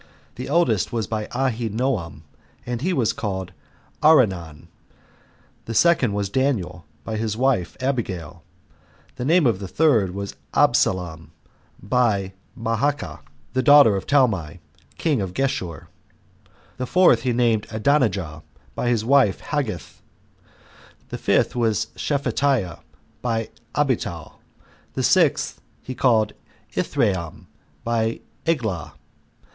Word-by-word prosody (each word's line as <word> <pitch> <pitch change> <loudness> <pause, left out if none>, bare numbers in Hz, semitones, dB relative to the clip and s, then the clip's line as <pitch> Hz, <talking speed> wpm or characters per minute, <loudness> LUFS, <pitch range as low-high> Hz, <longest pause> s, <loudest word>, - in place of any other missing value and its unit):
The 125 - -7
eldest 120 - +2
was 115 -3 -1
by 110 +1 -3
Ahinoam, 115 - -2 0.4
and 120 -1 -3
he 180 +6 0
was 130 -10 +1
called 95 -3 -4 0.5
Arenon; 95 - +3 1.0
the 115 - -5
second 150 -10 +4
was 100 -1 -1
Daniel, 100 - -1 0.2
by 110 +6 -4
his 110 -1 -2
wife 125 -9 0
Abigail; 95 - -3 0.8
the 125 - -3
name 165 +2 +4
of 115 -6 +2
the 100 - -6
third 110 - +2
was 100 0 -5 0.2
Absalom, 80 -3 +1 0.5
by 100 -4 +1 0.3
Maacah, 115 - -1 0.3
the 130 - +1
daughter 145 -7 +7
of 95 - -4
Talmai, 105 - +2 0.4
king 150 -9 +1
of 95 -2 -5
Geshur; 95 -11 -2 0.9
the 130 0 -3
fourth 175 -10 +5
he 125 - 0
named 115 -3 +1
Adonijah, 110 - 0 0.3
by 120 - -1
his 115 -2 +1
wife 130 -6 +4
Haggith; 110 - -4 1.1
the - - -6
fifth - - +2
was 110 -3 0
Shephatiah, 135 - 0 0.4
by 115 -2 -1 0.3
Abital; 115 - -1 0.6
the - - -1
sixth - - +2 0.2
he 130 - -5
called 115 -5 +2 0.4
Ithream, 85 -5 -1 0.4
by 115 -1 -1 0.3
Eglah. 110 - -1
115 Hz, 115 wpm, -23 LUFS, 95-130 Hz, 1.1 s, daughter